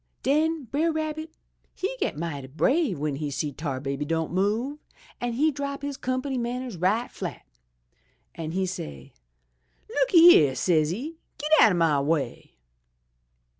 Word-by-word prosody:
"Den 310 +3 +1
Brer 290 +8 0
Rabbit 315 0 -3 0.5
he 400 +7 -3
get - - -1
mighty 150 -5 -4
brave 260 - +1
w'en 145 -1 -2
he 150 0 -3
see 145 +1 -2
Tar 140 -2 -4
Baby 140 +1 -3
don' 160 +1 -2
move, 220 +10 0 0.4
an' 240 -1 -2
he 300 +6 +2
drop 280 0 -5
his 285 -1 -3
comp'ny 255 0 -2
mannehs 245 -1 -3
right 195 +8 0
flat, - - -6 0.9
an' 160 -1 -5
he 190 +1 0
say, 75 - -7 0.7
'Look - - 0
yere,' 330 - +8
says'e, 180 - 0 0.2
'Get 300 +1 -4
out 215 - +7
o' - - 0
my 165 -4 +3
way!' 140 -4 -2
215 Hz, 145 wpm, -26 LUFS, -, 0.9 s, yere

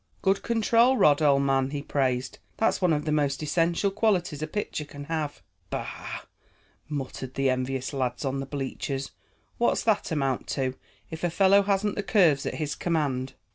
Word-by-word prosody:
"Good 195 +1 +2
control, 235 +3 +3
Rod, 145 -6 +5
old 140 -2 +4
man," 135 -1 +2
he 145 0 -4
praised. 130 -3 -1 0.2
"That's 225 - +1
one 180 -2 +3
of 150 -1 0
the 155 - 0
most 145 -1 +1
essential 170 +5 +1
qualities 185 -7 +1
a 155 - -2
pitcher 160 -3 -3
can 145 -1 -9
have." 150 -1 -3 0.3
"Bah!" - - -5 0.7
muttered 135 -2 -5
the 135 -1 +2
envious 130 +1 -2
lad 130 +1 -2
on 135 0 -1
the 135 - -4
bleachers. 135 -1 -4 0.5
"What's 240 - +2
that 220 -2 +1
amount 135 -6 -1
to, 130 -1 0 0.4
if 160 +1 -7
a 175 - +2
fellow 195 +3 +5
hasn't 200 +1 +1
the - - -2
curves 175 -9 +3
at - - -3
his 150 -2 -2
command?" 140 -6 -1
150 Hz, 175 wpm, -27 LUFS, 135-185 Hz, 0.7 s, Rod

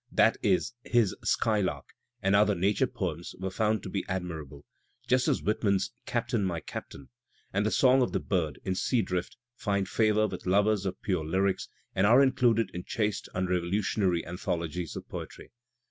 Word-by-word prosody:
That - - +4
is, - - +1
his 115 -5 +2
"Skylark" 105 -4 0 0.3
and 95 +1 +3
other 105 0 +4
nature 100 +8 +2
poems 90 -8 -4
were 95 0 -4
foimd 110 0 0
to - - -6
be 95 0 -2
admirable, 80 -6 -5 0.4
just 130 0 +3
as - - +1
Whitman's 100 -2 +1 0.2
"Captain, 120 -2 0
My 90 -3 -1
Captain" 70 -3 -8 0.4
and 100 +2 +1
the - - +2
song 130 +3 +4
of 125 - +1
the - - 0
bird 80 -8 -1
in 95 - 0
"Sea 115 +5 +1
Drift" 90 +4 -3 0.2
find 100 -3 -1
favour 110 -1 +2
with 105 - -6
lovers 100 +1 +3
of 95 - -4
pure 90 -5 0
lyrics 95 +5 0 0.2
and 95 +2 +3
are 125 +5 +7
included 120 -6 +2
in 90 - -5
chaste 105 -3 -2
unrevolutionary 90 0 0
anthologies 85 -1 -3
of - - -7
poetry. - - -8
100 Hz, 165 wpm, -29 LUFS, 90-110 Hz, 0.4 s, are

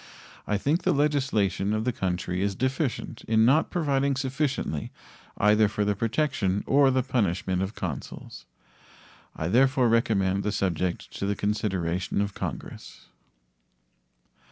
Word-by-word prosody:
I 105 - +1
think 145 - 0
the - - +2
legislation 130 -9 +1
of 110 0 0
the 125 - +2
country 90 -4 -2
is 100 0 0
deficient 130 - -2
in 110 0 +4
not 140 +6 +4
providing 140 -4 +1
sufficiently 135 - -2 0.5
either 105 +1 +4
for 105 0 -1
the 105 0 +1
protection 115 -4 0
or 140 0 +4
the 130 -1 +1
punishment 95 -7 0
of 95 +3 -3
consuls. 65 -6 -7 0.9
I 80 - -3
therefore 130 - +3
recommend 100 -4 +2
the 105 - -1
subject 90 -3 -2
to 100 - -1
the 100 - 0
consideration 95 -4 -1
of 100 0 -1
Congress. - - -7
105 Hz, 130 wpm, -26 LUFS, 95-130 Hz, 0.9 s, in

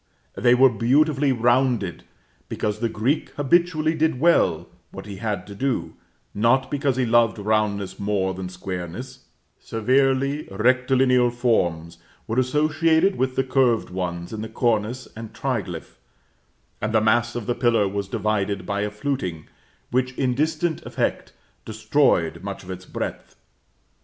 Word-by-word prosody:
They 125 0 +3
were 130 +1 +6
beautifully 140 +4 +2
rounded, 120 -6 +1 0.4
because 105 0 -2
the 115 0 0
Greek 120 +8 -1
habitually 160 +2 +2
did 160 -4 0
well 170 +3 +3 0.2
what - - -9
he 100 -2 -8
had 100 -3 -3
to 100 - -10
do, 100 -8 -2 0.4
not 120 +5 +2
because 140 -2 0
he 130 -1 +1
loved 115 -1 +3
roundness 105 -2 -1
more 100 -2 0
than 95 -1 -6
squareness; 95 +8 -7 0.3
severely 135 +5 +1
rectilinear 125 +3 +3
forms 85 -9 -1 0.3
were 115 +3 0
associated 155 +7 +2
with 130 0 -1
the 135 - +2
curved 130 -6 +1
ones 90 0 -4
in 110 - -4
the 110 - -6
cornice 115 +1 -1
and 115 -1 -8
triglyph, 110 -11 -4 0.8
and 110 +1 -2
the - - +6
mass 120 +2 +2
of 120 -3 -4
the 120 - 0
pillar 115 -4 +2
was 100 0 -3
divided 100 -2 -1
by 100 +1 -2
a 105 - -1
fluting, 105 - -4 0.4
which, 130 0 0
in 125 -1 0
distant 160 +4 -1
effect, - - -2 0.3
destroyed 110 - +1
much 100 0 -6
of 95 - -8
its 95 0 -8
breadth. - - -6
120 Hz, 140 wpm, -23 LUFS, 100-130 Hz, 0.8 s, were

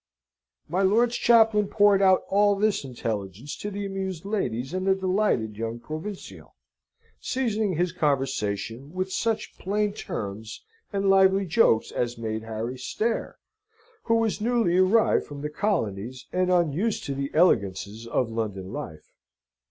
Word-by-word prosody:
My 180 +5 0
lord's 230 +5 +3
chaplain 225 -4 +4
poured 205 -1 +4
out 190 -1 +5
all 205 +1 +3
this 210 -2 +1
intelligence 115 -1 -5
to 205 - -5
the 205 0 -4
amused 190 -3 -4
ladies 135 - -2
and 185 +1 -2
the 190 - +4
delighted 185 - 0
young 115 +1 -3
provincial, 160 - -8 0.6
seasoning 220 -7 -1
his 175 +2 0
conversation 130 - -2
with 185 +1 -2
such 225 +2 -2
plain 205 +2 0
terms 110 - -6 0.3
and 200 -1 0
lively 195 0 +5
jokes 160 - +3
as 120 0 -2
made 110 -1 -3
Harry 115 +3 -5
stare, 225 - -2 0.7
who 230 - +3
was 225 -2 0
newly 230 -6 +2
arrived 205 +4 +3
from 145 -1 -8
the 150 - -3
colonies, 125 - -2
and 185 0 +1
unused 175 +5 +1
to 140 - -3
the 140 0 -3
elegances 105 - +1
of 115 0 0
London 100 -4 -4
life. 85 - -8
180 Hz, 140 wpm, -26 LUFS, -, 0.7 s, out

